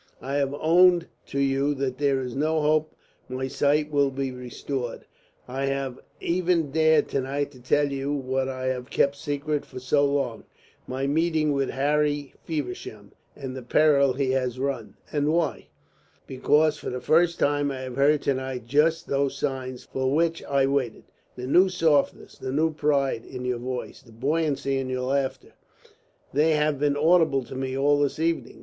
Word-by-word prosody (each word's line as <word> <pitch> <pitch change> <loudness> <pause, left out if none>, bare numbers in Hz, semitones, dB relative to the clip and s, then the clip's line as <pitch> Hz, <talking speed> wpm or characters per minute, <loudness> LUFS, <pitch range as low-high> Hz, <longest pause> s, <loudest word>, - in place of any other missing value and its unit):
I 135 - -5
have 140 0 0
owned 175 +3 +5 0.2
to - - -5
you 140 +1 +1
that 135 -1 -3
there 140 -2 +2
is 125 -1 -5
no 155 +3 +1
hope 155 +1 +1 0.3
my 130 +1 -3
sight 150 +2 +1
will 140 -1 +3
be 135 0 -3
restored. 125 0 -5 0.4
I 135 +2 -2
have 135 -2 -2 0.2
even 170 -3 +1
dared 160 0 +4
to 135 - 0
night 140 +2 -2
to 130 -3 -16
tell 145 +3 +2
you 140 +1 -2
what 135 -1 -1
I 130 -1 -4
have 130 0 -2
kept 140 0 +2
secret 145 0 -2
for - - -9
so 135 +3 +2
long, 140 -5 0 0.4
my 130 +1 -2
meeting 155 +1 +1
with 135 -1 0
Harry 145 +1 0
Feversham 125 -9 -5 0.2
and 135 -2 -6
the 130 - -6
peril 140 +1 +4
he 130 0 0
has 130 -2 -1
run. 130 -4 -3 0.2
And 145 0 +1
why? 165 -3 -1 0.6
Because 150 +3 +2
for - - -5
the 125 - -4
first 170 +5 +3
time 145 0 +1
I 135 -1 -4
have 130 -1 -6
heard 145 +2 +3
to 140 - +2
night 130 -2 -5
just 155 +6 +2
those 140 0 0
signs 130 -3 -3
for 130 0 -2
which 165 +1 +1
I 140 -1 +2
waited. 135 -4 -1 0.3
The 125 - -6
new 180 +8 +5
softness, 160 -6 +1
the 130 - -4
new 155 +3 +1
pride, 140 -5 +1
in 125 -1 -7
your 125 -1 -1
voice, 125 0 -5
the 115 - -19
buoyancy 140 +1 0
in 130 -1 -3
your 130 0 -2
laughter 135 0 -2 0.8
they 155 +3 +3
have 150 -2 +1
been 145 0 +1
audible 160 -3 +4
to 120 - -10
me 130 0 -3
all 145 +1 +3
this 145 -2 0
evening. 165 +1 -1
140 Hz, 180 wpm, -25 LUFS, 130-150 Hz, 0.8 s, owned